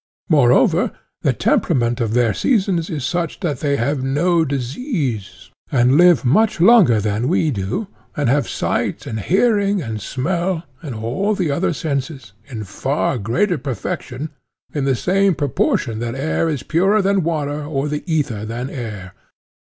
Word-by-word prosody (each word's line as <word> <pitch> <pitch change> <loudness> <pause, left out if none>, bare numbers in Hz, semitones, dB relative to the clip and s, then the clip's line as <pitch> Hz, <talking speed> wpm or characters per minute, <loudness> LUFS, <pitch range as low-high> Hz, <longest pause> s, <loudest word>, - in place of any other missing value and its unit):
Moreover, 135 -7 +4 0.3
the - - +2
temperament 120 0 +1
of 115 -1 -1
their 120 -3 +3
seasons 190 - +1
is 150 -7 -3
such 170 +4 -2
that 165 -7 -2
they 140 -2 0
have 140 +2 -1
no 165 +6 +2
disease, 135 - -3 0.2
and 125 0 +3
live 170 -6 +5
much 195 - +3
longer 180 - +6
than 105 +3 -1
we 160 -1 +2
do, 110 - -2 0.3
and 145 - +1
have 135 0 +1
sight - - -2
and 110 - -4
hearing 200 - +2
and 110 -8 -5
smell, 170 - -2 0.2
and 145 -8 -6
all 130 - -1
the 180 -6 0
other 170 +6 0
senses, 140 -3 -4
in 115 -6 -6
far 135 +6 -1
greater 170 - 0
perfection, 130 +3 -5 0.4
in 145 -3 -1
the 135 -1 +2
same 195 +6 +2
proportion 120 -5 0
that 120 +1 -3
air 155 +4 0
is 145 -5 -3
purer 195 +6 +2
than 195 0 +2
water 150 -3 -2
or 145 -1 -2
the 150 0 -3
ether 130 -10 -1
than 120 +4 -5
air. 105 -8 -6
145 Hz, 155 wpm, -19 LUFS, 120-175 Hz, 0.4 s, longer